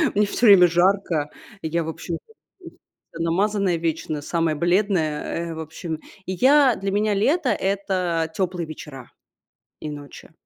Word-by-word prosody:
Мне 210 0 +4
всё 235 +4 -1
время 190 -4 +8
жарко. 175 -3 +1 0.3
Я, 165 +1 -1
в - - -7
общем, 165 +1 -5 1.0
намазанная 185 +2 0
вечно, 160 -2 -2
самая 165 0 0
бледная, 170 -2 0
э. - - -4
В - - -7
общем, 160 0 -6 0.3
и 185 - -3
я 265 +4 +5
для 195 0 -3
меня 210 +1 +1
лето- 275 - +2
это 185 -4 -1
теплые 180 -3 -2
вечера 145 -5 -10 0.7
и 155 - -5
ночи. 145 +1 -10
175 Hz, 140 wpm, -23 LUFS, 160-200 Hz, 1.0 s, время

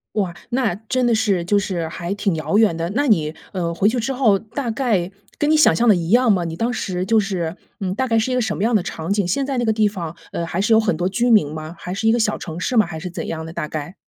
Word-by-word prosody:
哇， 185 -5 -1 0.2
那 240 -7 +1
真 240 +5 -1
的 235 - +3
是 205 -6 +1
就 205 +3 +2
是 175 -5 -2
还 170 +3 -5
挺 200 -4 0
遥 180 +6 0
远 205 -7 +4
的。 165 +2 -3
那 285 +2 +1
你， 160 -7 +2 0.2
呃， 170 -3 -2
回 195 +5 +2
去 245 +2 0
之 265 +4 -1
后 225 -7 +3
大 230 +3 -5
概 220 -7 0 0.3
跟 295 +1 +1
你 310 - +5
想 305 - +5
象 235 0 +2
的 205 - +6
一 170 +1 -3
样 240 0 +5
吗？ 180 -4 +2
你 165 -1 -4
当 230 +7 -1
时 185 -5 -3
就 225 -1 +3
是， 185 -4 -2 0.2
嗯， 185 -1 -2
大 260 +3 -1
概 225 -2 +2
是 225 +4 0
一 - - 0
个 250 - +2
什 215 -2 -1
么 - - -3
样 230 0 +3
的 190 - +1
场 165 0 -5
景， 200 -3 +1
现 270 +10 0
在 275 -2 -2
那 240 - 0
个 220 - +2
地 215 -1 +2
方， 170 -5 -6 0.2
呃， 170 - -2
还 170 +3 -2
是 220 +2 +3
有 220 - +6
很 200 -7 0
多 180 +1 +1
居 240 +5 +1
民 175 -10 +4
吗？ 155 +2 -7
还 180 - -5
是 220 +3 -2
一 225 - +5
个 240 - +2
小 215 -1 +1
城 165 0 -7
市 245 - -1
吗？ 215 - +6
还 160 -2 -7
是 180 - -5
怎 175 -1 -6
样 160 0 -4
的 165 - -8
大 150 - -3
概。 155 +4 -5
200 Hz, 325 characters per minute, -21 LUFS, 175-230 Hz, 0.3 s, 的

